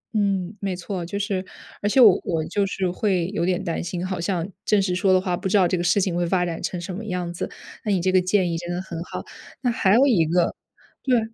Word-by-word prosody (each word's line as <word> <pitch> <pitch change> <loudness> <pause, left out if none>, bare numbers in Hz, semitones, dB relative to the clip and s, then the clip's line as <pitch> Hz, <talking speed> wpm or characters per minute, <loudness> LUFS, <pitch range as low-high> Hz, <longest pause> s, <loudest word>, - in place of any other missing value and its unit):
嗯， 195 -2 0
没 195 -2 -2
错。 180 0 -4
就 200 +4 -4
是 200 -2 -1 0.4
而 205 - +1
且 260 - +3
我 215 -7 +8
我 160 -2 -1
就 200 +4 0
是 190 -1 -1
会 185 -2 0
有 170 - 0
点 185 +1 0
担 170 -3 -2
心， 175 +1 -3
好 185 -2 -3
像 175 -1 -1 0.2
正 210 - +3
式 190 -2 0
说 190 +1 +2
的 185 - +5
话 185 -1 -1
不 190 - -3
知 205 - +4
道 185 -3 +5
这 180 - 0
个 175 - -1
事 175 +3 +3
情 185 -3 0
会 175 - +1
发 180 0 +2
展 170 -2 -4
成 180 - -3
什 175 +2 -5
么 215 - -6
样 180 -3 -3
子， 175 - -4 0.3
那 210 - -1
你 190 - +2
这 185 +2 +1
个 185 0 +4
建 180 -1 +1
议 - - -1
真 175 0 -5
的 175 - -2
很 170 -3 -6
好。 - - -6 0.4
那 245 - +1
还 215 -5 +3
有 260 +4 +6
一 220 -12 +4
个 170 +2 +1 0.5
对， 255 -3 +3
185 Hz, 285 characters per minute, -23 LUFS, 175-200 Hz, 0.5 s, 我